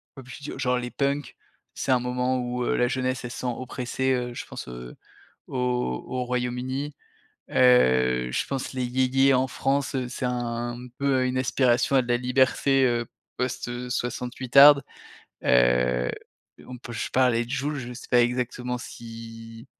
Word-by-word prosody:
pop 130 -2 -11
culture, 135 +1 -8
genre 125 -2 +1
les 125 0 -4
punks, 140 +1 -2 0.4
c'est 140 - -1
un 130 - +4
moment 125 +1 -1
où, 125 0 -2
heu, - - 0
la 125 - +3
jeunesse, 130 0 -2
elle 120 - -5
se - - -7
sent 125 - -3
oppressée, 130 +1 -2
heu, 125 -1 -2
je - - -6
pense, - - -8
heu, 60 0 -9 0.5
au 125 - -1
au 125 -1 -2
Royaume-Uni. 125 +3 -2 0.6
Heu, 65 - +4
je - - -1
pense 135 -1 -4
les 130 -1 -1
yéyés 130 +2 +3
en 130 +1 +2
France, 140 +1 -1
c'est 125 0 -3
un 120 -1 -2 0.2
peu 135 -2 +2
une 130 0 -1
aspiration 130 +1 +2
à 130 - +5
de 125 - -10
la 120 - +3
liberté, 130 +2 +2
heu, 120 -1 +1 0.3
post, 125 -1 -2
heu, 120 +1 -5
soixante-huitarde. 130 +4 +5 0.6
Heu, 60 0 +3 0.6
on 125 -1 -8
peut 120 0 -9
je - - -3
parlais 125 -2 +3
de 120 - -13
Jul, 140 +3 -1
je 125 -2 -6
sais - - -11
pas 120 -1 +6
exactement 125 0 -2
si 115 0 -10
125 Hz, 165 wpm, -25 LUFS, 120-130 Hz, 0.6 s, pas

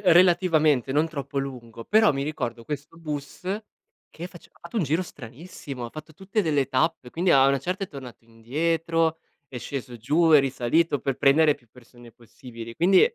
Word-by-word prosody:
relativamente, 165 -7 +4
non 150 +3 +2
troppo 140 -3 -4
lungo. 120 -4 -6
Però 215 -5 +4
mi 135 - -2
ricordo 125 -6 -4
questo 150 +2 -6
bus 150 0 -6 0.7
che 170 +2 -7
face 175 -2 -15
ha - - -26
fatto 170 +7 -8
un 205 - +2
giro 160 +4 0
stranissimo, 135 -2 -9
ha 115 - -6
fatto 155 +1 -10
tutte 195 +5 -2
delle 145 -5 +1
tappe, 135 -1 0
quindi 175 +5 0
a 135 -3 +6
una 140 0 +3
certa 185 +6 -3
è - - -13
tornato 125 -5 -11
indietro, 160 +8 -1 0.3
è 130 - -9
sceso 125 -1 -6
giù, 155 +9 +2
è 150 - +9
risalito 135 +4 +1
per 135 -2 -2
prendere 150 +2 +4
più 120 -5 -24
persone 120 -1 -16
possibili, 115 0 -11
quindi 180 +5 +5
145 Hz, 180 wpm, -25 LUFS, 125-165 Hz, 0.7 s, è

